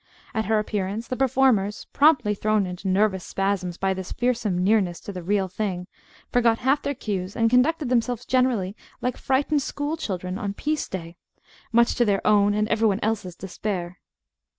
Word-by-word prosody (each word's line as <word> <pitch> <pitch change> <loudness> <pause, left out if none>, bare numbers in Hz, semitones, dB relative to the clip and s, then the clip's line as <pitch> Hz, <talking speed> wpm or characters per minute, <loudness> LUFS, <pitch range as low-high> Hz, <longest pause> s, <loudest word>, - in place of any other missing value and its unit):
At 220 -1 -1
her 220 0 +2
appearance 210 +1 -2
the 255 - -2
performers 250 -6 +2
promptly 280 -8 +4
thrown 215 0 +1
into 180 +1 -6
nervous 190 -1 +2
spasms 195 -3 -2
by 190 0 +1
this 190 -1 -6
fearsome 240 -6 0
nearness 190 -4 +2
to 200 - -7
the 180 - -5
"real 195 +2 0
thing" 185 -1 -3 0.5
forgot 235 -2 +3
half 270 +4 +1
their 285 - -2
cues, 200 -5 -4
and 230 0 +2
conducted 280 +3 +3
themselves 245 -1 0
generally 245 -7 +1 0.2
like 250 -1 -1
frightened 285 +2 +1
school 290 +3 -3
children 185 - -4
on 200 -1 -3
"piece 305 +4 -2
day," 170 -2 -6 0.5
much 235 +1 +4
to 240 - +2
their 200 -3 0
own 205 -1 +4
and 210 0 +1
every 225 0 +3
one 200 -1 +1
else's 205 -5 -2
despair. 185 -1 -5
210 Hz, 175 wpm, -24 LUFS, 190-245 Hz, 0.5 s, promptly